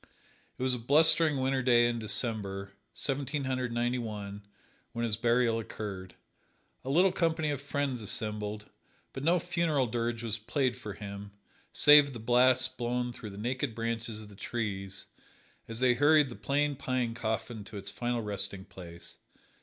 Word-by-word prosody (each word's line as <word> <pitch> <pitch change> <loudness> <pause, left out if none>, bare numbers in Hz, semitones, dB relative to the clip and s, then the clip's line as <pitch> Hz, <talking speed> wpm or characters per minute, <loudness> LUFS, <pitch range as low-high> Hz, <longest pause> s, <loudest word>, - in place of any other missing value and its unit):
It - - -4
was 130 -1 +2
a 125 - -2
blustering 155 +4 +4
winter 130 0 +1
day 120 -2 +5
in 120 -1 -1
December, 100 -3 0 0.2
Seventeen 140 +1 -2
Hundred 130 -2 -2
Ninety 120 +1 0
one, 105 -3 -6 0.5
when 115 - -2
his 110 -3 0
burial 115 0 +2
occurred. 100 -4 -7 0.7
A 130 - -5
little 180 +7 +4
company 160 -3 0
of 140 - -3
friends 140 -3 -2
assembled, 105 0 0 0.5
but 135 - -6
no 170 +4 +4
funeral 170 -5 0
dirge 115 0 -2
was 110 -1 -2
played 125 +3 0
for 110 -5 -7
him, 100 0 -8 0.4
save 145 -1 +7
the 120 - -7
blast 130 +2 +3
blown 120 0 -1
through 110 - -8
the 100 - -10
naked 125 +2 -2
branches 115 -1 -3
of 105 - -13
the 100 - -14
trees, 100 -3 -4 0.6
as 115 +1 -6
they 125 -1 +5
hurried 145 +2 +4
the 120 - -8
plain 145 +1 0
pine 130 -3 -1
coffin 110 -1 -3
to 105 -1 -9
its 100 0 -6
final 120 -1 -2
resting 100 -2 -4
place. 85 -2 -11
120 Hz, 160 wpm, -30 LUFS, 110-135 Hz, 0.7 s, save